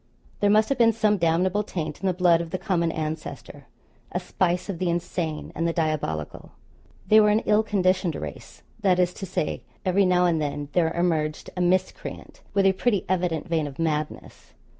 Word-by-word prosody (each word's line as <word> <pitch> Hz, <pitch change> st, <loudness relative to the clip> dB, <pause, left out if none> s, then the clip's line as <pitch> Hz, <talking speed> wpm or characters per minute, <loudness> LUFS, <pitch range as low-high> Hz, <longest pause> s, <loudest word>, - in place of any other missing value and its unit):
There 205 Hz, -, +3 dB
must 215 Hz, +1 st, +4 dB
have 275 Hz, -2 st, 0 dB
been 230 Hz, -1 st, +5 dB
some 215 Hz, -2 st, +2 dB
damnable 175 Hz, +4 st, +2 dB
taint 160 Hz, -7 st, -5 dB
in 195 Hz, -, 0 dB
the 185 Hz, -, +2 dB
blood 175 Hz, -2 st, +4 dB
of 170 Hz, -, -6 dB
the 185 Hz, -, -2 dB
common 170 Hz, -3 st, 0 dB
ancestor 155 Hz, 0 st, -6 dB, 0.4 s
a -, -, -1 dB
spice 180 Hz, -1 st, -1 dB
of 190 Hz, -5 st, -4 dB
the 185 Hz, -, 0 dB
insane 170 Hz, -2 st, -3 dB
and 165 Hz, -, -1 dB
the 165 Hz, -, 0 dB
diabolical. 155 Hz, -, -3 dB, 0.5 s
They 215 Hz, -, +6 dB
were 210 Hz, -1 st, +5 dB
an 210 Hz, +2 st, +3 dB
ill 210 Hz, 0 st, +4 dB
conditioned 185 Hz, -5 st, +1 dB
race 75 Hz, -2 st, -8 dB, 0.2 s
that 190 Hz, -3 st, +3 dB
is 180 Hz, 0 st, +2 dB
to 195 Hz, -, -7 dB
say, 165 Hz, -, -2 dB, 0.2 s
every 190 Hz, +1 st, +3 dB
now 180 Hz, 0 st, +3 dB
and 165 Hz, -3 st, +2 dB
then 145 Hz, -1 st, -3 dB
there 165 Hz, -2 st, +2 dB
emerged 160 Hz, -3 st, -1 dB
a 180 Hz, -, -2 dB
miscreant, 185 Hz, +1 st, -2 dB
with 195 Hz, -1 st, +3 dB
a 190 Hz, -, +5 dB
pretty 205 Hz, 0 st, 0 dB
evident 175 Hz, -3 st, 0 dB
vein 160 Hz, -3 st, 0 dB
of 140 Hz, -1 st, -9 dB
madness. 155 Hz, -2 st, -3 dB
180 Hz, 190 wpm, -25 LUFS, 160-190 Hz, 0.5 s, They